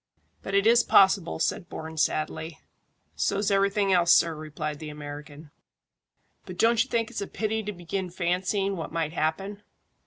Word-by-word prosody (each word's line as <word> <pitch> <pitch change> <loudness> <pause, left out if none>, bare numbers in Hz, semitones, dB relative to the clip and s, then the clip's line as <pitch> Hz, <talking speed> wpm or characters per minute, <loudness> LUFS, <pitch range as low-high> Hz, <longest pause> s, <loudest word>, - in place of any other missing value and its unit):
"But 195 - -4
it 200 +1 +3
is 235 +1 +6
possible," 190 -3 +4
said 170 +2 -1
Bourne 160 0 -7
sadly. 155 0 -1 0.6
"So's 195 - 0
everything 200 0 +2
else, 175 -1 +4
sir," 170 -1 +5
replied 150 -1 -5
the 155 - -7
American. 145 0 -9 1.0
"But 180 - -8
don't 230 +2 +4
you 260 - -14
think 230 -2 -1
it's - - -4
a 200 - -3
pity 220 0 -2
to 210 0 -4
begin 180 0 -4
fancying 185 +3 -1
what 165 - -6
might 165 -1 -2
happen?" 195 +6 -2
180 Hz, 160 wpm, -26 LUFS, 155-200 Hz, 1.0 s, is